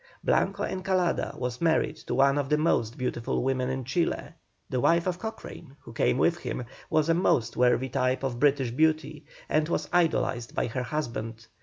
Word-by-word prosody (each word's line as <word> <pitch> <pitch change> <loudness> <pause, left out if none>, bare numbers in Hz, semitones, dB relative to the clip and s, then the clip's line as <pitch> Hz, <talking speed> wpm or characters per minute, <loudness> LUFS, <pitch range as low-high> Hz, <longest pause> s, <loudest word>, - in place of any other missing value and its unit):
Blanco 200 +1 +1
Encalada 185 -2 -1
was 125 -1 -4
married 165 -1 +2
to - - -4
one 140 +1 +4
of 140 -1 -2
the 150 - +3
most 120 -7 +1
beautiful 125 -2 -2
women 130 -1 0
in 130 0 -3
Chile; 165 +7 -1 0.4
the 130 - -2
wife 170 +6 +3
of 180 -1 -2
Cochrane, 185 -9 -8
who - - -12
came 60 - +1
with - - +2
him, 125 - -4 0.2
was 155 -1 +2
a 165 - +4
most 125 - +1
worthy 125 +1 +3
type 130 0 0
of 125 -3 -2
British 135 -3 +2
beauty, 155 +2 0 0.2
and 155 +1 +1
was - - -1
idolized 160 -8 +1
by - - +1
her 125 +2 -3
husband. 115 -5 -4
135 Hz, 180 wpm, -27 LUFS, 125-165 Hz, 0.4 s, one